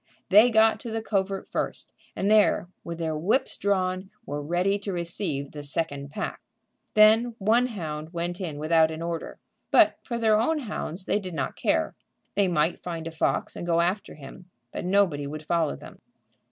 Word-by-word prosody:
They 210 Hz, +5 st, +7 dB
got 220 Hz, -1 st, +4 dB
to 235 Hz, -, -7 dB
the 225 Hz, 0 st, -3 dB
covert 195 Hz, -2 st, -1 dB
first, -, -, -3 dB, 0.2 s
and 200 Hz, +2 st, 0 dB
there, 210 Hz, -4 st, +4 dB, 0.2 s
with 170 Hz, -1 st, -6 dB
their 160 Hz, -2 st, -2 dB
whips 190 Hz, -, +1 dB
drawn, 185 Hz, -1 st, -1 dB, 0.2 s
were 145 Hz, -4 st, -4 dB
ready 180 Hz, +6 st, 0 dB
to 200 Hz, 0 st, -4 dB
receive 170 Hz, -5 st, -3 dB
the 150 Hz, -, -7 dB
second 145 Hz, -1 st, -3 dB
pack. 150 Hz, -, -5 dB, 0.5 s
Then 220 Hz, +2 st, +5 dB
one 230 Hz, +5 st, +3 dB
hound 160 Hz, -8 st, -5 dB
went 175 Hz, +2 st, -4 dB
in 160 Hz, -5 st, -4 dB
without 160 Hz, +1 st, +3 dB
an 160 Hz, +1 st, -5 dB
order; 170 Hz, -1 st, -4 dB, 0.3 s
but -, -, +5 dB
for 235 Hz, -, -4 dB
their 220 Hz, -2 st, +3 dB
own 305 Hz, +5 st, +1 dB
hounds 195 Hz, -, -5 dB
they -, -, +1 dB
did 185 Hz, -4 st, -7 dB
not 135 Hz, -3 st, -2 dB
care. -, -, 0 dB, 0.4 s
They 200 Hz, -1 st, +2 dB
might 165 Hz, -1 st, +1 dB
find 165 Hz, -2 st, -5 dB
a 165 Hz, -, -4 dB
fox 160 Hz, -, -1 dB
and -, -, -6 dB
go 170 Hz, -1 st, +1 dB
after 180 Hz, +4 st, -1 dB
him, 155 Hz, +5 st, -12 dB, 0.2 s
and 180 Hz, -, -3 dB
nobody 180 Hz, -8 st, +2 dB
would 155 Hz, +1 st, -6 dB
follow 165 Hz, -1 st, 0 dB
them. -, -, -11 dB
180 Hz, 180 wpm, -26 LUFS, 160-205 Hz, 0.5 s, They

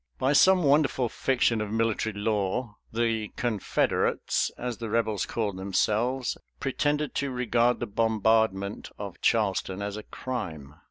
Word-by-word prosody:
By 135 Hz, +2 st, +2 dB
some 185 Hz, +4 st, +6 dB
wonderful 140 Hz, -4 st, +3 dB
fiction 120 Hz, -4 st, +1 dB
of 105 Hz, -1 st, -4 dB
military 110 Hz, -1 st, 0 dB
law 105 Hz, +2 st, -1 dB
the 115 Hz, -1 st, 0 dB
"Confederates," 115 Hz, -5 st, 0 dB
as 125 Hz, -1 st, -4 dB
the 115 Hz, -2 st, -4 dB
Rebels 110 Hz, -3 st, 0 dB
called 105 Hz, -5 st, -2 dB
themselves, 110 Hz, +6 st, 0 dB, 0.2 s
pretended 145 Hz, +2 st, 0 dB
to 140 Hz, -, -1 dB
regard 125 Hz, -1 st, +1 dB
the 120 Hz, -, -2 dB
bombardment 110 Hz, -2 st, +1 dB
of -, -, -7 dB
Charleston 95 Hz, +1 st, +1 dB
as 100 Hz, 0 st, -4 dB
a -, -, -5 dB
crime. 85 Hz, -, -6 dB
115 Hz, 130 wpm, -27 LUFS, 105-125 Hz, 0.2 s, some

